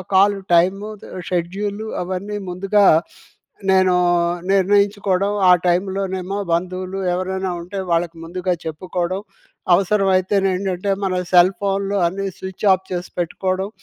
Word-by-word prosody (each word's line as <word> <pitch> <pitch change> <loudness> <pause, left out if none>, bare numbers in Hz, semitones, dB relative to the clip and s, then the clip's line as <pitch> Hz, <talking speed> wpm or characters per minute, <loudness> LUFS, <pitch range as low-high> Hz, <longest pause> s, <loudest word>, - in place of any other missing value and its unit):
Call 200 +2 +5 0.2
time, 190 +4 +3 0.5
schedule 195 +4 -2 0.2
అవన్నీ 190 +3 -4
ముందుగా 195 +3 +2 0.9
నేను 185 -1 +4 0.6
నేను 195 -1 +4
నిర్ణయించుకోవడం 200 0 +2 0.2
ఆ - - +9 0.2
టైమ్‌లోనేమో 190 +1 -1 0.2
బంధువులు 185 +2 -2
ఎవరైనా 190 +1 -2
ఉంటే, 180 +4 -8
వాళ్ళకి 170 0 0
ముందుగా 180 +2 -2
చెప్పుకోవడం 180 +3 -3 0.5
అవసరమైతే 190 0 +2 0.2
ఏంటంటే 185 +1 -2 0.2
మన 185 - 0 0.2
సెల్ 180 +2 +6
ఫోన్‌లు 200 0 -1
అన్నీ 195 +3 -3
స్విచ్ 190 +2 -6
ఆఫ్ 190 0 -3
చేసి 180 0 -4
పెట్టుకోవడం. 185 +3 -2
190 Hz, 115 wpm, -20 LUFS, 180-195 Hz, 0.9 s, ఆ